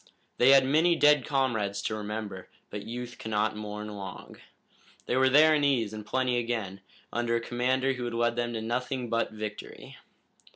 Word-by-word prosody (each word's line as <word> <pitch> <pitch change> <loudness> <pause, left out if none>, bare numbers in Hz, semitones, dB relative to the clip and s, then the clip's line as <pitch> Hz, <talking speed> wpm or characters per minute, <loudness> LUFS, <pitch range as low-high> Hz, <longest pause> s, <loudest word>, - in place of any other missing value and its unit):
They 125 - +6
had 135 -1 +7
many 160 +5 +3
dead 150 -4 +4
comrades 115 -8 0
to - - -2
remember, 105 -3 -6 0.2
but 105 -1 -6
youth 120 +1 -7
cannot 110 0 -1
mourn 105 0 -6
long. 100 -3 -8 0.7
They - - -1
were 130 0 +4
there 155 +3 +6
in 150 -1 +2
ease 120 -7 +1
and 110 0 -6
plenty 125 +2 0
again, 110 -5 -3 0.3
under 120 0 0
a - - +2
commander 130 +3 0
who 125 -1 -5
had 120 -1 -4
led 120 0 +1
them 120 0 -2
to 110 -1 -4
nothing 125 +1 -3
but 115 0 +1
victory. 105 -1 -8
120 Hz, 175 wpm, -28 LUFS, 105-130 Hz, 0.7 s, had